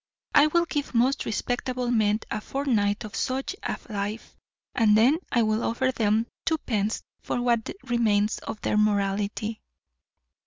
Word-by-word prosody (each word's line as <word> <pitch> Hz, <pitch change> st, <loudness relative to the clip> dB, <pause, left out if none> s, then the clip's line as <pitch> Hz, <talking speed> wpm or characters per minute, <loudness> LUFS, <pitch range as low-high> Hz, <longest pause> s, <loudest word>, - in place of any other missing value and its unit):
I 290 Hz, +1 st, +7 dB
will 340 Hz, +2 st, +2 dB
give 290 Hz, -5 st, -3 dB
most 250 Hz, +4 st, +2 dB
respectable 245 Hz, +2 st, -2 dB
men 215 Hz, -2 st, +2 dB
a 215 Hz, -, -2 dB
fortnight 220 Hz, -7 st, 0 dB
of 210 Hz, -, -8 dB
such 265 Hz, +8 st, -2 dB
a -, -, -3 dB
life, 210 Hz, 0 st, -4 dB, 0.4 s
and 215 Hz, -3 st, +4 dB
then 260 Hz, +9 st, +4 dB
I 235 Hz, -, +3 dB
will 215 Hz, +1 st, +1 dB
offer 260 Hz, +3 st, +1 dB
them 220 Hz, -2 st, +1 dB, 0.2 s
twopence 225 Hz, -10 st, -1 dB, 0.2 s
for -, -, -2 dB
what 235 Hz, -2 st, +1 dB
remains 220 Hz, -4 st, +1 dB
of 215 Hz, -, -6 dB
their -, -, 0 dB
morality. 210 Hz, +1 st, 0 dB
225 Hz, 145 wpm, -26 LUFS, 210-255 Hz, 0.4 s, I